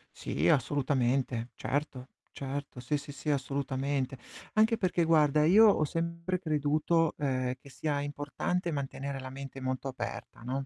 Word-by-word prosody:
Sì, - - 0
assolutamente, 130 -4 +1
certo, 135 0 -3 0.2
certo, 140 -1 -5
sì, 140 +4 0
sì, 145 +1 -8
sì 150 - -5
assolutamente. 135 -1 -1 0.4
Anche 220 +2 +4
perché, 185 -5 +1
guarda, 150 -2 +4
io 210 +7 +8
ho 200 -6 +4
sempre 170 +3 -2
creduto, 155 0 +2
ehm, 130 -3 0
che 140 - -14
sia 145 +2 -2
importante 145 +5 -2
mantenere 140 -1 -3
la 130 0 -6
mente 135 0 -8
molto 130 +1 -2
aperta, 130 -2 -6
no, 130 +3 -3
145 Hz, 140 wpm, -30 LUFS, 135-155 Hz, 0.4 s, io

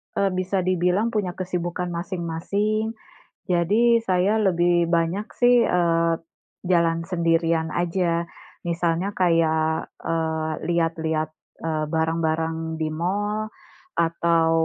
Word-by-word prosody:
eee, 200 -1 +2
bisa 185 +1 0
dibilang 185 +4 +1
punya 200 -5 -1
kesibukan 180 -1 -3
masing-masing. 195 +5 -2 0.6
Jadi 215 +7 +3
saya 190 +3 +2
lebih 175 -2 +3
banyak 170 +5 +1
sih, 245 -1 +5
eee, 170 -1 +2 0.5
jalan 170 -2 +2
sendirian 165 -2 +1
aja. 170 -1 0 0.4
Misalnya 170 +2 0
kayak, 160 -2 +2
eee, 160 -1 -1 0.2
lihat-lihat, 160 -2 0 0.3
eee, 155 -1 -1
barang-barang 160 0 -1
di 160 - -1
mall 205 +6 -1 0.5
atau, 165 0 +2
170 Hz, 100 wpm, -24 LUFS, 165-185 Hz, 0.6 s, sih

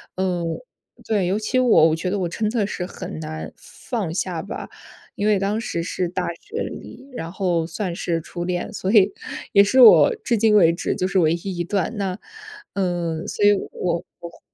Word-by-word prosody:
嗯 180 -2 -1 0.6
对， 205 -4 +1
尤 190 +3 +1
其 235 +4 -1
我， 225 -10 +5
我 155 - +1
觉 170 +3 -3
得 205 - 0
我 180 - 0
真 215 +5 -2
的 220 -3 0
是 180 - -4
很 170 - -7
难 155 0 -6
放 210 -10 -5
下 175 -2 -2
吧。 200 - -7 0.5
因 205 - -1
为 210 -1 +4
当 200 +3 -1
时 170 -7 -3
是 180 +1 -2
大 180 0 -2 0.2
学 450 - -8
里， 265 - -9
然 165 -6 -5
后 175 -3 0
算 180 +1 -4
是 170 -1 -1
初 175 +2 -6
恋， 180 +2 -3
所 190 -2 -2
以 205 -3 +5 0.4
也 200 - +7
是 255 +6 +2
我 470 - +8
至 235 - +1
今 215 0 +4
为 170 -5 +6
止 170 - -2
就 185 - -1
是 190 0 +1
唯 160 -2 +3
一 175 +2 -4
一 175 - -1
段。 200 +4 -1
那， 190 -2 -2 0.6
嗯， 175 -4 -2
所 - - -3
以 205 - +7 0.2
我 170 -2 -2 0.2
我 170 - -8
会 170 - -19
185 Hz, 220 characters per minute, -22 LUFS, 170-205 Hz, 0.6 s, 我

